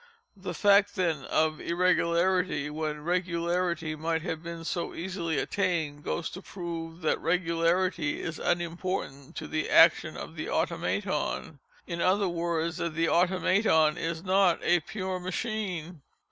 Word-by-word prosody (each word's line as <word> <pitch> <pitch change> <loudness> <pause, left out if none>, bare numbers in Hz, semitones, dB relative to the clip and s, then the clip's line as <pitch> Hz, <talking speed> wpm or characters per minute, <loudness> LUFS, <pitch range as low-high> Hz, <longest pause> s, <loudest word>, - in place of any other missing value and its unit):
The 185 -3 -6
fact 200 +2 +4
then 165 -7 0
of 155 0 +1
irregularity, 175 -2 +1
when 150 -1 -3
regularity 170 -2 -1
might 160 +1 -1
have 165 -3 -3
been 170 -1 -7
so 170 0 -3
easily 170 -3 -3
attained, 165 -7 -1
goes 165 - -2
to 185 - -8
prove 170 -3 -6
that 160 - 0
regularity 170 -1 +1
is 165 -1 -5
unimportant 170 -5 -2
to - - -5
the 155 0 -2
action - - +5
of - - -8
the - - -4
Automaton—in 470 - -2
other 195 +2 +3
words, 170 -1 -1
that 170 -2 -3
the 165 +1 +2
Automaton 180 -3 +3
is 165 0 -3
not 190 -2 +3
a 175 0 +4
_pure 185 +2 -4
machine. 185 -4 -3
170 Hz, 130 wpm, -28 LUFS, 160-185 Hz, -, action